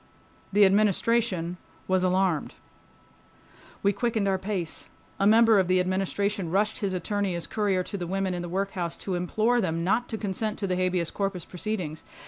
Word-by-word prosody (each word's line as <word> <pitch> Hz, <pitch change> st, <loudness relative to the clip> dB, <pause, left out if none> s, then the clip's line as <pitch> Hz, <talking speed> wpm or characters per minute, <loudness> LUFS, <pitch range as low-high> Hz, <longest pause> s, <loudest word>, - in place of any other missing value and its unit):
The 205 Hz, +1 st, +6 dB
Administration 200 Hz, -2 st, +2 dB, 0.3 s
was 185 Hz, 0 st, +2 dB
alarmed. 185 Hz, -4 st, +1 dB, 1.3 s
We 200 Hz, 0 st, +3 dB
quickened 220 Hz, -1 st, 0 dB
our 190 Hz, -1 st, +1 dB
pace. 185 Hz, -4 st, -4 dB, 0.3 s
A 195 Hz, -, +4 dB
member 225 Hz, -1 st, +6 dB
of 185 Hz, -, +2 dB
the 185 Hz, 0 st, +3 dB
Administration 190 Hz, 0 st, -1 dB
rushed 205 Hz, +5 st, +1 dB
his 195 Hz, -2 st, -1 dB
attorney 200 Hz, 0 st, -1 dB
as 170 Hz, -, -4 dB
courier 200 Hz, -4 st, 0 dB
to 200 Hz, +2 st, -6 dB
the 175 Hz, -, -4 dB
women 190 Hz, 0 st, -1 dB
in 175 Hz, -, -3 dB
the 175 Hz, -, -5 dB
workhouse 185 Hz, -2 st, -2 dB
to 190 Hz, -, -4 dB
implore 215 Hz, +7 st, +1 dB
them 165 Hz, -3 st, -1 dB
not 225 Hz, +7 st, +1 dB
to 220 Hz, -, -3 dB
consent 210 Hz, +1 st, -3 dB
to 205 Hz, -, -2 dB
the 185 Hz, -2 st, 0 dB
habeas 180 Hz, -2 st, 0 dB
corpus 195 Hz, -4 st, -3 dB
proceedings. 180 Hz, -5 st, -4 dB
190 Hz, 170 wpm, -27 LUFS, 180-210 Hz, 1.3 s, The